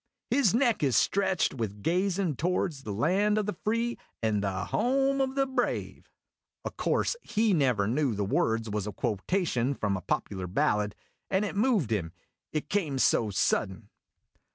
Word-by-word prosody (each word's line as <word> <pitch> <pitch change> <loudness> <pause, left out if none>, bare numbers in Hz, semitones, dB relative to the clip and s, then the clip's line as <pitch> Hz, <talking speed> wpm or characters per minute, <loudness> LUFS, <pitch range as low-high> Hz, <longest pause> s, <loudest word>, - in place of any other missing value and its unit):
" - - -60
His 230 -8 +3
neck 240 -3 +2
is 135 -5 +2
stretched 190 -3 +2
with 105 -5 -5
gazin' 180 -1 +1
to 165 - 0
wards 175 -5 -1
the 110 - -6
land 190 - +2
o' 215 - +2
the 210 -2 -3
free 230 +2 0 0.2
and 105 -2 +1
the 95 -2 -2
home 270 +2 +1
o' 265 -1 +1
the 275 0 +1
brave! 265 0 -2 0.3
' - - -43
O' - - -2
course - - 0
he 220 - +1
never 125 - +2
knew 130 0 +1
the 100 0 -1
words 115 +3 0
was 105 -1 -3
a - - -3
quotation 125 - -1
from 100 -4 -1
a 95 - -4
popular 95 +1 -2
ballad, 105 +3 0 0.3
and 195 +2 +1
it 205 - -4
moved 205 - +2
him 85 -6 -1 0.4
it 155 - -3
came 160 -9 -1
so 115 -4 +3
sudden. 100 +1 0
150 Hz, 175 wpm, -28 LUFS, -, 0.4 s, His